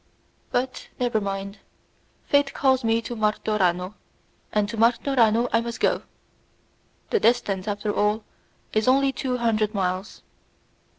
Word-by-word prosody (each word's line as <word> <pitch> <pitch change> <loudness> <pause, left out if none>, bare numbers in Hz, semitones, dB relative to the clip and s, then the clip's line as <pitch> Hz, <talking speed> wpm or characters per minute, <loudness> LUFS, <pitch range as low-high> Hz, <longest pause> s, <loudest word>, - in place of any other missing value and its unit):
But 255 +1 -2
never 240 -3 +1
mind; 195 0 -4 0.7
fate 285 -1 +2
calls 265 -2 +2
me 225 0 +1
to 240 +1 -5
Martorano, 210 -4 0 0.6
and 210 -1 +1
to 230 - -5
Martorano 235 0 +3
I 230 - +4
must 235 0 -5
go. - - +2 1.1
The 450 - +3
distance, 220 - +1
after 205 0 -2
all, 210 +1 +1 0.5
is 215 +1 +1
only 270 +1 +4
two 255 -1 -2
hundred 220 -2 0
miles. 185 0 -2
225 Hz, 125 wpm, -24 LUFS, 205-245 Hz, 1.1 s, I